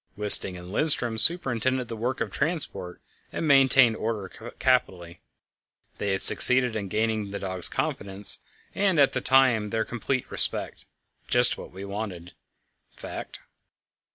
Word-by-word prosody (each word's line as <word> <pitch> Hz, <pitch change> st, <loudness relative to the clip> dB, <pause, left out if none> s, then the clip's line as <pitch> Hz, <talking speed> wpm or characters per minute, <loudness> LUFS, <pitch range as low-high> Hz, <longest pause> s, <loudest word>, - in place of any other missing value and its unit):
Wisting 100 Hz, -3 st, +6 dB
and 90 Hz, +1 st, -13 dB
Lindström 120 Hz, -3 st, +3 dB
superintended 130 Hz, -5 st, 0 dB
the 115 Hz, -, -8 dB
work 120 Hz, +3 st, -5 dB
of 110 Hz, -4 st, -5 dB
transport, 150 Hz, -, -2 dB, 0.3 s
and 160 Hz, -, -5 dB
maintained 135 Hz, -4 st, +3 dB
order 110 Hz, -4 st, -6 dB, 0.3 s
capitally. 95 Hz, -10 st, -3 dB, 0.8 s
They 100 Hz, -, -4 dB
had 95 Hz, -, -4 dB
succeeded 125 Hz, -2 st, +6 dB
in 100 Hz, -2 st, -6 dB
gaining 110 Hz, 0 st, -4 dB
the 100 Hz, -, -7 dB
dogs' 95 Hz, -3 st, -2 dB
confidence, 100 Hz, 0 st, -1 dB, 0.3 s
and 195 Hz, -5 st, -1 dB
at 140 Hz, -, +2 dB
the 125 Hz, -, -3 dB
same -, -, -16 dB
time 130 Hz, -5 st, +1 dB
their 110 Hz, +1 st, -4 dB
complete 125 Hz, +2 st, -5 dB
respect -, -, -2 dB, 0.4 s
just 125 Hz, 0 st, +2 dB
what -, -, -12 dB
was 95 Hz, +2 st, -11 dB
wanted, 100 Hz, -4 st, -8 dB
in -, -, -42 dB
fact. -, -, -11 dB
110 Hz, 145 wpm, -23 LUFS, 100-130 Hz, 0.8 s, Wisting